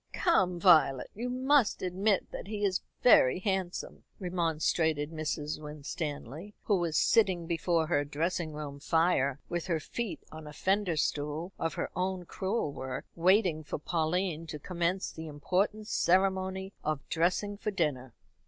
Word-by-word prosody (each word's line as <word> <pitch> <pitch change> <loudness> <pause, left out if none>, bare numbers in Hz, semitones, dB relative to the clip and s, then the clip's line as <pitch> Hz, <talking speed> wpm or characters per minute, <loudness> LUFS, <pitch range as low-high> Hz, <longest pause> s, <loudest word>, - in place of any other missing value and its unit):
"Come, 185 - +2
Violet, 155 -7 +5
you 240 +4 -4
must 260 -3 +2
admit 190 +2 0
that - - -7
he 210 -1 -2
is 190 -2 +1 0.2
very 155 - +6
handsome," 190 -2 -3 0.2
remonstrated 160 -4 0
Mrs. 155 -1 -3
Winstanley, 150 - -6
who 205 - +2
was 165 -3 0
sitting 190 -7 +3
before 165 0 +1
her 155 -3 +1
dressing 160 +3 -2
room 150 -2 -6
fire, 145 -4 +2
with 175 0 -3
her 170 -3 +1
feet 230 +7 -5
on 155 -1 -9
a 150 - -9
fender 190 -1 0
stool 150 +5 -1
of 165 - -1
her - - -3
own 185 0 -2
crewel 190 -5 -2
work, 130 -1 -5
waiting 180 -2 +3
for 150 - -4
Pauline 165 +1 -1
to 150 - -5
commence 180 +4 -2
the 160 0 -8
important 190 +8 -1
ceremony 190 0 +1
of 150 -1 -2
dressing 180 +5 0
for 210 - -3
dinner. 145 - -2
175 Hz, 145 wpm, -30 LUFS, 155-190 Hz, 0.2 s, very